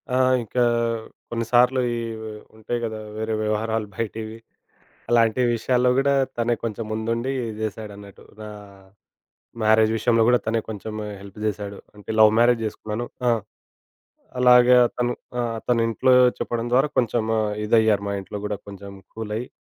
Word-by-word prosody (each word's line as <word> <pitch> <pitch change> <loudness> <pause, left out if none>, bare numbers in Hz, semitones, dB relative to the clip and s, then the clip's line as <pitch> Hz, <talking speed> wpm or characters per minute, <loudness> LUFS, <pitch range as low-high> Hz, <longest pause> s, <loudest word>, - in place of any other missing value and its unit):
ఆ! - - +3 0.3
ఇంకా 125 +3 0 0.7
కొన్ని 115 0 -2
సార్లు 125 +2 +4 0.2
ఇవి 115 -1 -5 0.3
ఉంటాయి 120 +2 -3
కదా 110 -1 -5 0.2
వేరే 110 0 -2
వ్యవహారాలు 110 0 -1
బయటివి, 110 0 -5 0.7
అలాంటి 115 0 +3
విషయాల్లో 125 +2 +1
కూడా 140 +1 +2 0.2
తనే 120 0 +1
కొంచెం 115 -1 -3
ముందుండి 115 +4 -2 0.3
జేశాడన్నట్టు. 105 -2 -7 0.2
నా 110 - -7 1.2
మ్యారేజ్ 110 0 +4
విషయం 115 +1 +2
గూడా, 125 0 +4
తనే 115 +1 +1
కొంచమే 105 0 -6
హెల్ప్ 100 +1 -12
జేశాడు. 100 -1 -3 0.2
అంటే 105 - -15
లవ్ 110 0 +7
మ్యారేజ్ 120 -1 +3
జేసుకున్నాను 110 +2 -4 0.2
ఆ! - - +5 1.1
అలాగే 125 0 +6
అతను 120 0 -2 0.3
ఆ! - - +2 0.3
తను 120 -2 +2
ఇంట్లో 120 +3 +3 0.3
చెప్పడం 115 -1 -2
ద్వారా, 135 +4 +3
కొంచెం 120 -1 0 0.2
ఆహ్, 105 -1 -1
ఇదయ్యారు 110 -2 +3
మా - - -2
ఇంట్లో 100 +2 -7
గూడా, 105 -1 -3
కొంచెం 100 0 -9 0.2
కూలయ్యి, 110 +2 -4
110 Hz, 140 wpm, -23 LUFS, 105-120 Hz, 1.2 s, లవ్